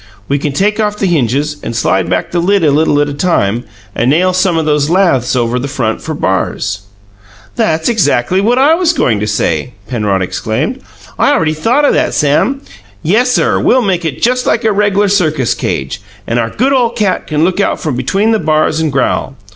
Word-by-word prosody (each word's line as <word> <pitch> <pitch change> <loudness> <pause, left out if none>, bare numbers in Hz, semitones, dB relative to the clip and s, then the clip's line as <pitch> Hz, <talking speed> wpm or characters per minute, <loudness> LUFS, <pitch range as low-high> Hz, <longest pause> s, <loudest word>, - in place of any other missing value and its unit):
We 140 +1 0
can 145 +1 -2
take 205 +9 0
off 210 -1 0
the 200 - -1
hinges 150 - 0
and 115 - -5
slide 95 -4 0
back - - -1
the 175 - 0
lid 195 +2 +1
a 150 - +4
little 150 0 +2
at 145 - +1
a 145 - -4
time, 120 - 0 0.3
and 120 - 0
nail 180 +6 +2
some 185 -2 +1
o' 160 - +1
those 150 -1 +1
laths 170 -10 +2
over 120 0 0
the 135 - -3
front 120 -5 -2
for 160 - -5
bars." 100 -2 -2 0.8
"That's 160 0 0
just - - +3 0.2
exackly 145 +8 +1
what 235 +5 +2
I 280 +4 +4
was 340 0 +2
goin' 120 - +1
to 105 - -2
say!" 100 0 -1
Penrod 105 -6 -1
exclaimed. 110 - -3 0.4
"I - - +3
already 160 - +1
thought 240 - +1
o' - - +4
that, - - 0
Sam. 150 - +1 0.4
Yessir, 245 +9 +2
we'll 255 0 +2
make 185 -4 0
it 160 -4 -4
just 250 +1 +1
like - - +1
a 220 - +3
reg'lar 205 0 +1
circus 155 - +1
cage, 65 0 -4 0.2
and 115 +1 -1
our 115 -1 -1
good 260 - 0
ole 245 -3 +2
cat 215 -5 -1
can 155 0 0
look 185 +3 0
out 200 - 0
from 150 -5 -3
between 195 - 0
the 220 - +2
bars 155 -1 +1
and 160 -2 0
growl. 135 0 -1
155 Hz, 210 wpm, -13 LUFS, 130-205 Hz, 0.8 s, a